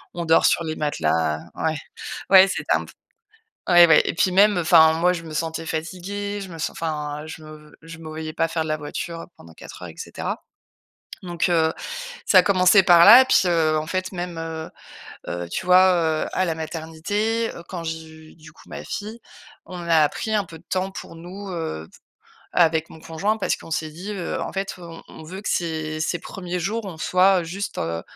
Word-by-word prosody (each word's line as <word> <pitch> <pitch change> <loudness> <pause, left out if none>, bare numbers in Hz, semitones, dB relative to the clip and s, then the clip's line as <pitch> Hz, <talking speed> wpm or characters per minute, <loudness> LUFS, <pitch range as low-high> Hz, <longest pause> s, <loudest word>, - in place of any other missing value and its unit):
on 170 -1 -3
dort 160 0 +4
sur 170 - +3
les 155 0 -3
matelas. 80 - 0 0.2
Ouais. 155 -1 -1 0.5
Ouais, 190 0 +8
c'était - - 0
un - - -1
p - - -14 0.8
ouais, 175 -1 +8
ouais, 150 - +7
et - - -2
puis, 185 +2 +1
même, 205 +1 +5
heu, - - 0
enfin, 160 -1 +6
moi, 175 +2 +2
je 165 - -6
me 155 -1 -8
sentais 165 +1 -3
fatiguée. 195 +6 -4
Je 190 - -8
me 165 - -9
sen - - -2
enfin, 150 -2 -4
je 160 0 -9
me 150 -1 -13
je 165 0 -11
me 160 -1 -9
voyais 155 0 -6
pas 165 - 0
faire 165 -1 -1
de - - -6
la 155 0 -1
voiture 165 +3 -6
pendant 85 0 -15
4 - - -12
heures - - -7
et - - -14
cetera. - - -5 0.8
Donc, 175 0 -1
heu, 160 -2 +3 0.5
ça 185 - +6
a - - +5
commencé 190 0 +5
par 170 -2 +7
là 235 +5 +11
et - - +2
puis, - - +4
heu, 160 -3 +2
en 155 - -6
fait, 185 +2 -3
même, 175 -1 -5
heu 160 -1 -5 0.6
heu, 85 0 -4
tu - - -4
vois, 185 +1 +6 0.3
heu, - - -6
à 185 - +1
la 165 - -1
maternité, 170 +9 -2
heu, 170 - -9
quand 175 -3 -6
j'ai 160 0 -5
eu, 160 0 -15
du 160 -1 -15
coup, - - -19
ma - - -7
fille, 220 +3 -6 0.5
on 180 -1 -8
a 155 -3 +5
pris 220 -1 -4
un 210 - +2
peu 165 -1 -12
de 170 - -23
temps 190 +1 -1
pour 190 - -9
nous, 185 +4 -9
heu, 160 - -5
f - - -17 0.5
avec 160 -2 +2
mon - - -12
conjoint 195 +8 -2
parce - - 0
qu'on - - -13
s'est 155 0 -2
dit, 180 +7 -8
heu: 185 -4 -4
«En - - -5
fait, 195 0 -3
on 170 -2 -11
on - - -12
veut 190 +5 -8
que - - -2
ses 160 -2 -2
ses 175 +2 -1
1ers 180 -2 -5
jours, 210 +4 -3
on 170 -4 -7
soit 185 +2 +3
juste, 195 +5 -5
heu, 85 0 -3
165 Hz, 220 wpm, -23 LUFS, 160-185 Hz, 0.8 s, là